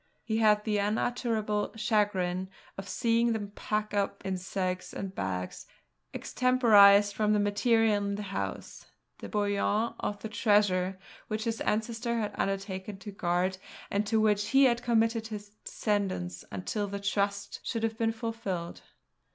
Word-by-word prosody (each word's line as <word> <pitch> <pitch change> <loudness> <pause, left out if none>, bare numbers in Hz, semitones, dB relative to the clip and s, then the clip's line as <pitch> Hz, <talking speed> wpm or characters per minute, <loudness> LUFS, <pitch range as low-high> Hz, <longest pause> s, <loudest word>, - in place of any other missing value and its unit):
He 220 -1 -1
had 210 -1 +4
the 210 -1 0
unutterable 215 0 -1
chagrin 200 -4 0 0.3
of 195 0 -7
seeing 230 +3 +2
them 205 -2 -4
pack 210 0 -2
up 200 -1 -1
in 190 -1 -1
sacks 185 0 -3
and 195 -1 -5
bags, 90 - -4 0.4
extemporised 205 -5 +5
from 210 +1 +1
the 210 - +3
material 215 +1 +3
in 200 0 -1
the 210 - -4
house, 195 -1 -5 0.3
the - - -7
bullion 205 +2 0
of 205 - -2
the - - -2
treasure 205 -4 +2 0.3
which 215 0 -2
his 230 -1 -2
ancestor 230 +2 -1
had 215 -2 -2
undertaken 195 0 -3
to 205 +2 -8
guard, 185 0 0 0.3
and 205 +1 0
to 220 +1 +2
which 210 -1 +2
he 270 +4 +5
had 240 -2 +3
committed 225 -1 +1
his 210 -2 -7
descendants 190 - -2
until 200 - -3
the 200 0 -4
trust 200 0 -1
should 225 -1 -3
have 225 0 -1
been 225 -1 +2
fulfilled. 225 -7 -4
210 Hz, 150 wpm, -29 LUFS, 195-225 Hz, 0.4 s, extemporised